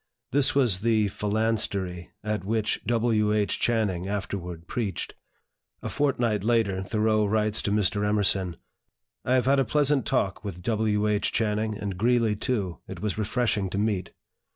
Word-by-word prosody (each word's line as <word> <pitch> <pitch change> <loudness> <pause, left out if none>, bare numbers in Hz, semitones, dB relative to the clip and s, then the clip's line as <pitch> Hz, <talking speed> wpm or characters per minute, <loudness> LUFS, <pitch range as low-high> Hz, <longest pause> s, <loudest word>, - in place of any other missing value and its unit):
This 140 -1 +3
was 120 -9 +3
the 110 -1 +2
"Phalanstery" 100 -4 -1
at 105 -3 -2
which 110 +1 0
W. 115 -2 +2
H. 105 -1 +1
Channing 100 -6 0
afterward 90 -4 -4
preached. 105 -2 -3 0.7
A - - -3
fortnight 120 -8 0
later, 110 -5 +1
Thoreau 110 +2 +1
writes 110 +1 +1
to 100 - -1
Mr. 105 0 +1
Emerson: 100 -4 +1 0.7
"I 130 - +2
have 125 -2 +2
had 135 +1 +4
a - - +4
pleasant 145 +1 +1
talk 95 0 0
with 90 -4 -6
W. 105 -1 +1
H. 105 -1 +1
Channing; 110 -1 0
and 100 -3 -5
Greeley, 115 -1 +2
too, 105 -6 -2
it - - -7
was 105 0 -2
refreshing 110 -2 0
to 95 - -4
meet. 100 -3 -1
105 Hz, 155 wpm, -26 LUFS, 100-115 Hz, 0.7 s, had